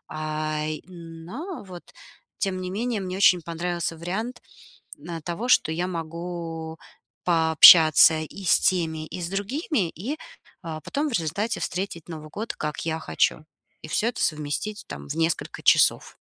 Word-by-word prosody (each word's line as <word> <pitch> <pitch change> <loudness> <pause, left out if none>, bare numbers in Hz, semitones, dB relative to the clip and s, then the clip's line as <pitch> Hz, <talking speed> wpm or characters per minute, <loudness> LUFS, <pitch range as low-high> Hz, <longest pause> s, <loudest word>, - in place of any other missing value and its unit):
Э, 155 0 -2 0.2
но 175 - -8
вот 180 -3 -10 0.6
тем 190 -2 -1
не 185 - -4
менее 230 +1 -2
мне 185 0 -4
очень 185 -3 +5
понравился 170 0 -3
вариант, 220 +9 -4 0.6
э, 165 +2 -7
того, 180 +8 -4
что 160 -10 +4
я 175 +3 -1
могу 165 -1 -6 0.5
пообщаться 160 -1 +7
и 195 +5 -9
с - - +5
теми, 160 -4 0
и 180 - -7
с 170 - -3
другими. 205 - -1
И, 220 - -5 0.5
э, 160 -2 -5
потом 285 - -2
в - - -6
результате 200 +5 -1
встретить 175 -3 -4
Новый 155 -2 -8
год, 215 +8 -5
как 150 -1 -4
я 160 0 -1
хочу. 155 -1 0 0.4
И - - -7
всё 215 +8 0
это 240 - -3
совместить 155 +8 -2
там 70 0 -8
в - - -5
несколько 165 0 -1
часов. - - +4
170 Hz, 150 wpm, -25 LUFS, 160-195 Hz, 0.6 s, пообщаться